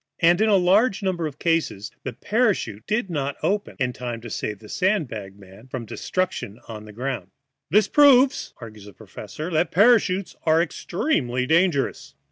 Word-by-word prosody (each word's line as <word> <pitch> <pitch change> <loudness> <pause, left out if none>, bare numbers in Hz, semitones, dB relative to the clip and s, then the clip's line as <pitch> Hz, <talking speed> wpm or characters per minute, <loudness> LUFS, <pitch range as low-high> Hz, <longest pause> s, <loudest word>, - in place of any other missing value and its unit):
And 175 +3 +4
in 220 - +3
a 205 - +5
large 195 +4 +3
number 175 -4 -1
of 145 -2 -9
cases 165 - -1
the - - -5
parachute 205 - -1
did 215 -2 -1
not 140 -3 -2
open 205 +1 -1
in 125 -3 -1
time 120 -2 -5
to 115 -1 -9
save 105 - -3
the 105 - -15
sand 185 - 0
bag 100 -4 -8
man 100 +4 -16
from 130 -2 -6
destruction 150 - -3
on 110 -2 -8
the 105 - -11
ground. 120 -4 -4 0.4
"That 210 0 +2
proves," 275 -2 +5
argues 110 -3 -11
the 105 - -12
professor, 155 - -8
"that 160 +2 +1
parachutes 195 -3 +3
are 160 0 +3
extremely 150 - -1
dangerous." 160 -1 +1
160 Hz, 170 wpm, -23 LUFS, 115-195 Hz, 0.4 s, a